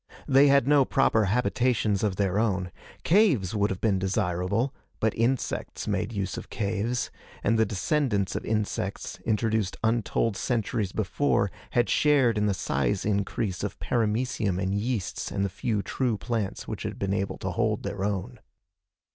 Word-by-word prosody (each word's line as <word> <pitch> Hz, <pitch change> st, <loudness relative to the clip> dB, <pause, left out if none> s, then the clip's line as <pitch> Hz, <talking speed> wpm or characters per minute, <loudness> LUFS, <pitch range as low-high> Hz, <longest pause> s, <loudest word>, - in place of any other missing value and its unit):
They 135 Hz, +1 st, +6 dB
had 140 Hz, -2 st, +4 dB
no 145 Hz, -1 st, +6 dB
proper 115 Hz, -5 st, +2 dB
habitations 120 Hz, -1 st, +1 dB
of 105 Hz, -3 st, 0 dB
their 100 Hz, 0 st, +1 dB
own. 95 Hz, -5 st, 0 dB, 0.3 s
Caves 160 Hz, -, +3 dB
would 105 Hz, -1 st, +1 dB
have 95 Hz, -, -3 dB
been 100 Hz, -4 st, +2 dB
desirable, 95 Hz, +5 st, 0 dB, 0.3 s
but 110 Hz, -1 st, +1 dB
insects 120 Hz, +3 st, -1 dB
made 110 Hz, -, -1 dB
use 100 Hz, -4 st, -3 dB
of -, -, -7 dB
caves, 110 Hz, +4 st, -2 dB, 0.3 s
and 115 Hz, +1 st, +2 dB
the 110 Hz, -, +4 dB
descendants 105 Hz, -, 0 dB
of -, -, -2 dB
insects 105 Hz, -3 st, -2 dB
introduced 110 Hz, -3 st, 0 dB
untold 115 Hz, -1 st, +1 dB
centuries 110 Hz, -4 st, -1 dB
before 110 Hz, -1 st, +1 dB, 0.2 s
had 120 Hz, -1 st, +3 dB
shared 135 Hz, -7 st, +3 dB
in 105 Hz, -, +2 dB
the 100 Hz, -, +1 dB
size 70 Hz, -8 st, -1 dB
increase 100 Hz, -1 st, -1 dB
of 100 Hz, -, -3 dB
paramecium 110 Hz, -4 st, 0 dB
and 95 Hz, 0 st, -1 dB
yeasts 105 Hz, -2 st, -2 dB
and 100 Hz, -, 0 dB
the -, -, -1 dB
few 105 Hz, +2 st, -2 dB
true 125 Hz, -5 st, -1 dB
plants 110 Hz, -3 st, -3 dB
which -, -, -5 dB
had -, -, -4 dB
been 100 Hz, 0 st, -1 dB
able 100 Hz, 0 st, -2 dB
to -, -, -3 dB
hold -, -, 0 dB
their 100 Hz, -1 st, -3 dB
own. 105 Hz, +4 st, -3 dB
105 Hz, 160 wpm, -27 LUFS, 100-120 Hz, 0.3 s, They